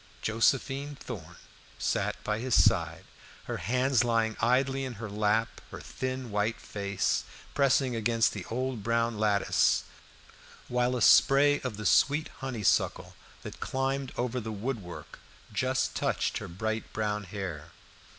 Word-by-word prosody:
Josephine 135 +5 +1
Thorn - - -8 0.4
sat - - 0
by 105 0 -1
his 125 0 0
side, 85 -5 +3 0.4
her - - -4
hands 125 +1 +2
lying 115 -2 +1
idly 135 +3 +2
in 130 -2 -4
her 110 -1 -7
lap, 105 +2 0
her - - -8
thin 130 -2 -5
white 105 +1 0
face 100 -2 -1 0.3
pressing 135 -2 +2
against 115 0 +2
the - - -5
old 125 -1 -3
brown 115 0 0
lattice, 105 -2 +2 0.8
while 125 +1 +1
a 120 - 0
spray 145 +1 +6
of 125 -6 -4
the 105 - -6
sweet 145 +9 +3
honeysuckle 125 -7 0 0.3
that - - -8
climbed 135 0 -2
over 125 +1 -1
the 110 -1 -5
wood 110 +3 -3
work 90 -2 -10 0.3
just 130 +4 0
touched - - -1
her - - -7
bright 110 +5 -3
brown 105 -1 -2
hair. 90 -6 -6
115 Hz, 140 wpm, -29 LUFS, 105-130 Hz, 0.8 s, spray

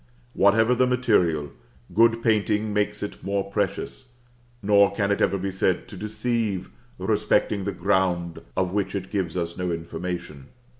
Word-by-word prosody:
Whatever 110 +4 +4
the 125 +1 +3
material, 90 - +2 0.4
good 115 +3 +4
painting 110 -1 +1
makes 105 0 -1
it 105 - -7
more 100 0 -2
precious; 120 +4 -3 0.5
nor 100 0 +5
can 100 0 0
it 100 - 0
ever 100 - +2
be 95 +1 -3
said 95 -1 0
to - - -9
deceive 110 -1 -2 0.3
respecting 100 -3 +1
the 100 - -1
ground 90 -2 0 0.2
of 90 -1 0
which 100 0 -1
it 95 -1 -4
gives 90 -4 -2
us 85 -1 -2
no 90 0 -1
information. 85 -3 -5
100 Hz, 150 wpm, -25 LUFS, 90-105 Hz, 0.5 s, nor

